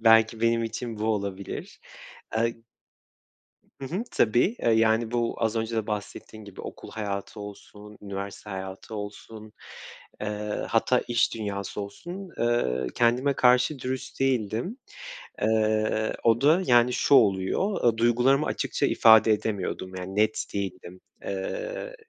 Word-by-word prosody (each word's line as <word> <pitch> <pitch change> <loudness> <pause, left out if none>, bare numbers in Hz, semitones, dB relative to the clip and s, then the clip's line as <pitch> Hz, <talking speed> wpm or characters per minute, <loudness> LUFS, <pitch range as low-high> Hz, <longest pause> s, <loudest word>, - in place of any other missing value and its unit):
Belki 110 0 +5
benim 115 0 +2
için 115 0 -5
bu 110 - -2
olabilir. 100 -3 -4 0.6
Eee 115 +1 +1 1.3
Hı - - -4
hı, 185 - -2
tabii. 120 - +2
Eee, 115 - +2
yani, 110 +1 +3
bu 120 -1 0
az 110 0 0
önce 115 +1 -2
de 110 -1 -1
bahsettiğin 105 +1 -6
gibi 100 -2 -10
okul - - -9
hayatı 100 0 -5
olsun, 105 0 -11
üniversite 100 +1 -7
hayatı 95 +2 -7
olsun, 105 +1 -8 0.7
eee, 105 0 -3
hatta 120 +2 +2
iş 120 -1 +2
dünyası 100 -2 -4
olsun, 175 - -7
eee, 115 - +1
kendime 125 +4 +2
karşı 125 +3 +3
dürüst 130 +1 -5
değildim. 130 - 0 0.6
Eee, 110 0 +1
o 115 +1 +3
da, 160 +6 +5
yani, 120 0 +4
şu 140 - +4
oluyor, 100 - +2
eee, 110 - -11
duygularımı 125 +5 +3
açıkça - - -1
ifade 110 0 +6
edemiyordum. 95 -3 -2
Yani, 95 +1 -6
net 110 +1 +1
değildim. 95 -2 -5 0.2
Eee, - - -4
110 Hz, 130 wpm, -26 LUFS, 105-120 Hz, 1.3 s, ifade